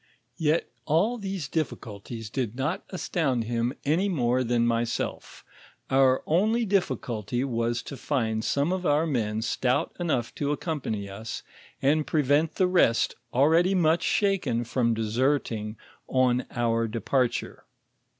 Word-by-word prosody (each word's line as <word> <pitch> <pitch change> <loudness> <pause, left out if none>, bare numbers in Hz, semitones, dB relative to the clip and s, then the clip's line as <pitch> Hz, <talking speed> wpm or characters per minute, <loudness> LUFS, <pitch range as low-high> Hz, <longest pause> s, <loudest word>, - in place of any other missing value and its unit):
Yet 160 +1 +2 0.2
all 205 +11 +2
these 195 -6 -4
difficulties 115 -7 -4
did 120 -4 -2
not 145 +7 -2
astound 150 -9 -1
him 120 +1 -1
any 170 +8 +2
more 130 -6 +1
than 120 -1 +1
myself; 115 0 -2 0.5
our 130 -1 +4
only 215 +8 +2
difficulty 125 - -1
was 120 -2 -1
to 140 - -7
find 115 -6 -1
some 140 +8 +1
of 185 -1 -2
owr 150 -1 +3
men 110 -7 -1
stout 125 +4 0
enough 145 -9 -1
to 145 0 +1
accompany 140 - -3
us 105 +3 -6 0.4
and 150 +2 +2
prevent 150 +1 +2
the 185 - +3
rest 180 -10 +3 0.2
already 165 +8 +4
mxich 165 -1 +3
shaken 195 - +1
from 115 -1 +1
deserting 115 -1 0 0.3
on 130 -1 +2
our 115 -1 0
departure." 120 +3 -1
130 Hz, 130 wpm, -27 LUFS, 115-160 Hz, 0.5 s, our